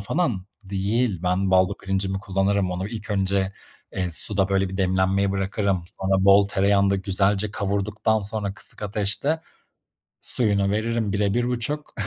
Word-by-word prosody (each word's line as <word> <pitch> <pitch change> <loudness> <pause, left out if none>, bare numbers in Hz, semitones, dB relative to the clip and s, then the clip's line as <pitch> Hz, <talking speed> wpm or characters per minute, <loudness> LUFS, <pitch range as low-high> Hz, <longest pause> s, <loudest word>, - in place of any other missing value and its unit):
falan 105 - -1 0.2
değil. 100 +1 -1
Ben 95 +1 +1
baldo 95 -1 +3
pirincimi 95 0 -2
kullanırım. 95 -1 0
Onu 95 +3 -3
ilk 105 -2 -7
önce, 95 -1 0 0.4
eee, 90 -2 -2
suda, 95 +3 +2
böyle, 95 -1 +1
bir 95 - -6
demlenmeye 95 +1 +1
bırakırım. 95 -1 -1
Sonra 95 0 0
bol 100 0 +6
tereyağında 100 0 +2
güzelce 100 +2 0
kavurduktan 105 +2 -1
sonra 100 -1 -4
kısık - - -3
ateşte 105 +10 0 0.8
suyunu 100 -4 +2
veririm 110 0 -1
1'e 100 -1 +1
1,5. 125 +5 -2
100 Hz, 135 wpm, -24 LUFS, 95-105 Hz, 0.8 s, bol